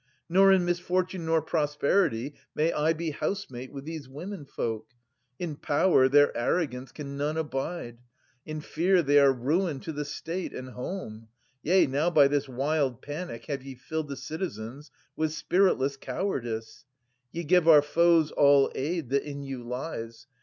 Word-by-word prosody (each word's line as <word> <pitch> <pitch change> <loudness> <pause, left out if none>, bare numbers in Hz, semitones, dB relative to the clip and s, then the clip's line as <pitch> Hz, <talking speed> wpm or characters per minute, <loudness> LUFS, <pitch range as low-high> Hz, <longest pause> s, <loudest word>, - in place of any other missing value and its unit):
Nor 195 +3 +6
in 185 -2 +4
misfortune 180 0 -1
nor 160 -1 +2
prosperity 145 - +1 0.2
May 160 +2 +2
I 155 +2 +2
be 165 0 -2
housemate 130 -7 -4
with 140 -1 -8
these 155 -4 -7
womenfolk! 140 - -5 0.5
In 170 -4 -4
power, 145 -2 +3
their 145 +1 +5
arrogance 130 0 -1
can 140 -2 -7
none 150 +2 -1
abide; 135 -4 -4 0.4
In 155 0 -6
fear, 175 +4 +2
they 145 0 +5
are 140 -1 +6
ruin 145 +5 0
to 160 - -5
the 150 0 -3
state 165 +5 -5
and 130 0 -6
home. 125 - -6 0.3
190 150 - -6
Yea, 185 +1 +6
now 145 +5 +1
by 150 -5 +6
this 145 0 -1
wild 135 -1 -1
panic 145 -6 -6
have 140 -2 -3
ye 135 0 -9
filled 155 +5 -4
The 140 - -5
citizens 135 - -6 0.3
with 155 -1 -1
spiritless 160 -4 +2
cowardice. 120 - -4 0.5
Ye 170 - -4
give 175 +1 +3
our 150 -3 +8
foes 165 0 +3
all 140 -1 +5
aid 155 -1 -2
that 140 0 +3
in 140 -1 -7
you 135 -2 -6
lies 120 -1 -6
145 Hz, 160 wpm, -28 LUFS, 135-170 Hz, 0.5 s, our